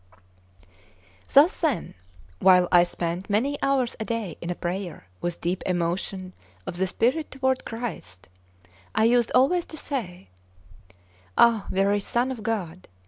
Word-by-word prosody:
Thus 295 +6 +5
then, 290 - 0 0.5
while 180 -1 +6
I 175 -1 +7
spent 175 +2 -4
many 265 +8 +1
hours 270 -3 +1
a - - -2
day 220 -7 -3
in 175 - -3
prayer 175 - -5 0.2
with 175 -1 -3
deep 175 +2 -1
emotion 185 +1 -2 0.3
of 175 - -5
the 190 +1 +1
spirit 255 - 0
toward 265 -1 -1
Christ, 225 - -6 0.7
I 220 - +3
used 240 0 +3
always 310 +8 +3
to 315 - -9
say: 180 - -5 1.1
"Ah, 230 -3 +4
very 200 +2 +2
Son 240 +5 -1
of 245 -4 -6
God! 185 -6 -4
205 Hz, 135 wpm, -25 LUFS, 180-250 Hz, 1.1 s, I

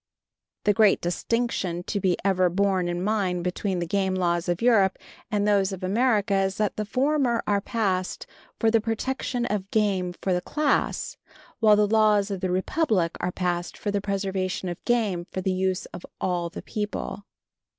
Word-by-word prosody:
The 205 - +4
great 210 -1 +4
distinction 180 -1 -1
to 200 - -2
be 185 -2 +1
ever 185 -2 +3
borne 190 0 +1
in 175 +1 -2
mind 190 -4 0
between 185 +1 -2
the 175 - -1
game 190 +1 0
laws 175 -1 0
of 175 0 0
Europe 220 -6 +4 0.3
and 210 -2 0
those 200 -1 +3
of 190 -1 -6
America 205 0 +2
is, 190 0 -1
that 210 -1 0
the 215 - -2
former 255 0 +1
were 200 -1 +2
passed 190 -5 -1 0.3
for 225 -1 +2
the 225 -1 +3
protection 240 +2 -2
of 200 -4 -2
game 195 -5 +1
for 185 -2 0
a 180 - -1
class, 300 +9 0 0.4
while 215 -2 +6
the 210 0 +4
laws 210 -1 +3
of 190 -1 -4
a 185 - +1
republic 185 - +1
are 180 - -1
passed 175 -1 -2
for 205 - -2
the 200 0 0
preservation 190 -2 -2
of 175 - -7
game 210 -8 0
for 185 - -4
the 185 0 0
use 185 0 -1
of 175 - -8 0.2
all 175 -2 -1
the - - -8
people. 210 -1 -4
195 Hz, 180 wpm, -25 LUFS, 185-215 Hz, 0.4 s, while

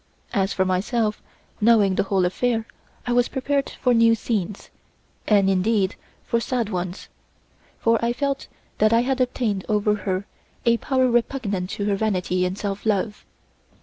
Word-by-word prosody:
As 195 -3 +1
for 190 - +1
myself, 210 +4 0 0.4
knowing 210 -3 +5
the - - +2
whole 195 -2 +1
affair, 225 +5 0 0.4
I 245 - 0
was 245 0 +3
prepared 280 +1 -1
for 250 - 0
new 230 -1 +5
scenes, 210 -3 -3 0.6
and 200 -2 +4
indeed 195 +1 +1 0.3
for 235 - 0
sad 235 -2 -1
ones, 180 -1 -4 0.7
for 230 0 +2
I 235 - +2
felt 275 +2 -2 0.3
that 215 +1 +4
I 230 - +5
had 265 0 0
obtained 235 -6 0
over 210 0 +2
her 190 -1 -2 0.4
a 235 0 +4
power 260 +1 +1
repugnant 230 -6 0
to 200 - -2
her 205 -1 +1
vanity 185 -3 0
and 180 +2 -3
self 200 -1 -4
love. 210 0 -1
215 Hz, 155 wpm, -23 LUFS, 195-240 Hz, 0.7 s, knowing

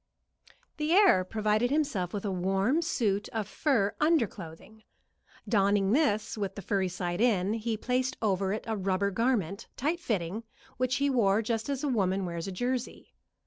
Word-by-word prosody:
The 305 +2 0
heir 380 - +6
provided 215 +4 0
himself 275 - 0
with 205 0 -4
a 200 - -1
warm 195 - +1
suit 215 -11 0
of 220 -3 -3
fur 225 -7 +1
under 310 -4 +4
clothing. 190 +3 -11 0.7
Donning 200 -2 +2
this 220 -6 +1
with 200 -3 -3
the 200 - -7
furry 190 0 0
side 175 +1 -3
in, 205 -4 +2
he 225 0 -2
placed 255 +3 -1
over 195 -3 0
it 215 - -3
a 225 - -2
rubber 195 0 0
garment, 210 -3 -1
tight 315 +6 0
fitting, 205 - -2 0.3
which 255 0 +1
he 280 0 +1
wore 220 -4 +3
just 225 +2 -2
as 275 0 -2
a - - +1
woman 195 -6 +1
wears 170 0 -4
a - - -4
jersey. 245 +6 -3
215 Hz, 170 wpm, -29 LUFS, 195-250 Hz, 0.7 s, heir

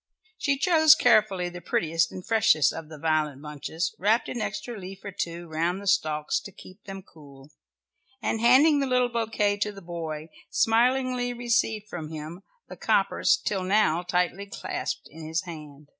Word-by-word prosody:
She 280 -2 +1
chose 315 -1 +6
carefully 215 -9 +3
the 175 0 -9
prettiest 165 0 0
and 185 - -8
freshest 160 - +3
of 165 -1 -8
the 155 - -9
violet 155 -2 0
bunches, 155 +3 -4
wrapped 220 +5 +2
an 240 - -4
extra 240 +1 -4
leaf 195 -1 -10
or 200 - -5
two 170 -1 -5
round 165 +4 -1
the 200 - -10
stalks 155 -6 +1
to 200 - -11
keep 185 0 -15
them 195 -1 -8
cool, 140 -4 -16 0.7
and 225 -2 -2
handing 280 +6 +6
the 275 - 0
little 250 -1 +2
bouquet 225 -3 0
to 210 +1 -1
the 200 - -11
boy, 165 -3 -6 0.2
smilingly 245 +2 +2
received 235 -3 0
from 160 -6 -6
him 160 +3 -8 0.3
the - - -10
coppers - - +2
till 195 -2 -2
now 185 -3 +2
tightly 180 +2 -1
clasped - - -5
in 160 +1 -10
his 160 +3 -1
hand. 150 -4 -10
185 Hz, 170 wpm, -26 LUFS, 160-225 Hz, 0.7 s, chose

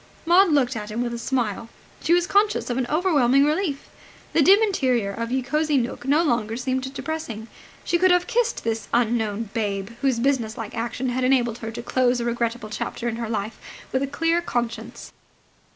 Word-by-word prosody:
Maud 360 +3 +5
looked 265 -4 +2
at 210 -1 -5
him 225 +3 -2
with 240 -1 -3
a 235 - -4
smile. 235 -3 -2 0.3
She - - -1
was 350 0 +4
conscious 405 -6 +2
of 240 - -1
an 250 - -1
overwhelming 285 -5 +3
relief. 305 -2 -1 0.5
The 330 - +4
dim 385 +7 +7
interior 255 - +1
of 230 +3 -4
Ye 260 0 0
Cosy 300 +2 +1
Nooke 245 0 -2
no 300 +4 +4
longer 235 -6 0
seemed 260 +1 -2
depressing. 275 -7 -5 0.4
She 345 - +1
could 370 +1 +5
have 360 0 +4
kissed 480 0 0
this 225 -1 -2
unknown 225 -3 0
"Babe" 200 -2 -2
whose 270 -4 +2
businesslike 235 -4 -1
action 240 +2 -2
had 255 +1 -1
enabled 245 -3 +2
her 225 - -5
to 235 +1 -7
close 250 0 +1
a 235 - -2
regrettable 235 -2 -2
chapter 240 - -4
in 230 -1 -2
her 230 -2 -4
life 215 0 -3 0.3
with 260 - 0
a 275 - 0
clear 330 +4 +1
conscience. 235 -5 -4
245 Hz, 190 wpm, -23 LUFS, 230-295 Hz, 0.5 s, dim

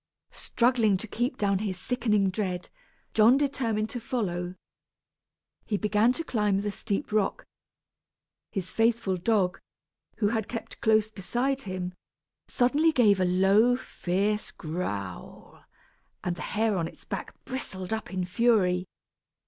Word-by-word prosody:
Struggling 235 -5 +2
to 225 - -7
keep 245 +5 -2
down 200 -4 +1
his 195 -3 -2
sickening 210 -3 +1
dread, 185 -3 -3 0.4
John 225 +4 +6
determined 235 -7 0
to 245 - -4
follow. 185 -8 -2 1.1
He 210 - 0
began 210 +3 +3
to 330 - -4
climb 210 -8 +1
the 205 0 -2
steep 200 0 -3
rock. 210 -2 0 1.1
His 185 -3 -4
faithful 225 -4 +2
dog, 185 0 +1 0.6
who 205 - +2
had 220 -2 -1
kept 230 - -7
close 220 -1 +3
beside 245 +7 -1
him, 185 -3 -4 0.5
suddenly 285 +6 +3
gave 215 -9 +4
a 185 - +3
low 195 +7 +4
fierce 205 -1 -1
growl, 105 - -6 0.6
and 175 -1 -1
the - - -8 0.2
hair 220 -2 +2
on 165 -2 0
its - - -13
back - - -5
bristled 190 -7 -5
up 220 -1 -4
in 185 -1 -1
fury. 185 -3 +2
210 Hz, 130 wpm, -28 LUFS, 185-235 Hz, 1.1 s, John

